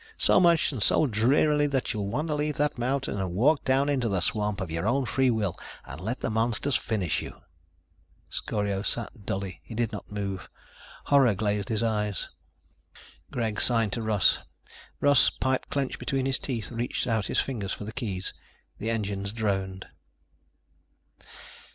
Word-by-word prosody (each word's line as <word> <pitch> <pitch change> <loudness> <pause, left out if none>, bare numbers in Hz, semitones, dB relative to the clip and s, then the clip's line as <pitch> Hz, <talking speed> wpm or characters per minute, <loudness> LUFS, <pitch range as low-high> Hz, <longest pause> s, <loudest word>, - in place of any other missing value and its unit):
So - - +5
much 170 -2 +4
and 130 -7 -5
so 155 - +5
drearily 145 +6 +3
that 135 -3 -1
you'll 105 -3 -2
want 150 +10 -2
to - - +1
leave 150 0 -1
that 150 0 +1
mountain 130 -3 -1
and 90 -2 -3
walk 140 +9 +3
down 135 +1 +2
into 130 -5 +1
the 95 -2 +1
swamp, 105 +3 -1
of 95 -4 -4
your 85 +5 -1
own 135 +3 +2
free 130 +2 +2
will, 105 -6 0 0.3
and 70 +5 -9
let 115 +7 -3
the - - -1
monsters 115 +4 +1
finish 100 -8 0
you." - - -8 0.9
Scorio 100 -2 -2
sat 110 0 -4
dully. 95 -2 -3
He 115 - -9
did 115 0 0
not 105 - -8
move. 100 -2 -4 0.6
Horror 135 -7 +5
glazed 105 0 -1
his 110 0 0
eyes. 105 -3 -1 1.0
Greg 110 -3 -1
signed 115 -4 +3
to 115 - -2
Russ. 110 -4 +3 0.6
Russ, 145 -2 +6
pipe 130 0 -1
clenched 140 -2 -2
between 135 -1 -1
his 135 -1 +1
teeth, 120 -6 -3
reached 120 +1 -2
out 110 -5 0
his - - +1
fingers 105 -8 -2
for - - -4
the 110 +2 -7
keys. 100 -7 -3 0.5
The 110 - -2
engines 100 -3 -2
droned. 95 -4 -2
110 Hz, 165 wpm, -27 LUFS, 100-130 Hz, 1.0 s, Russ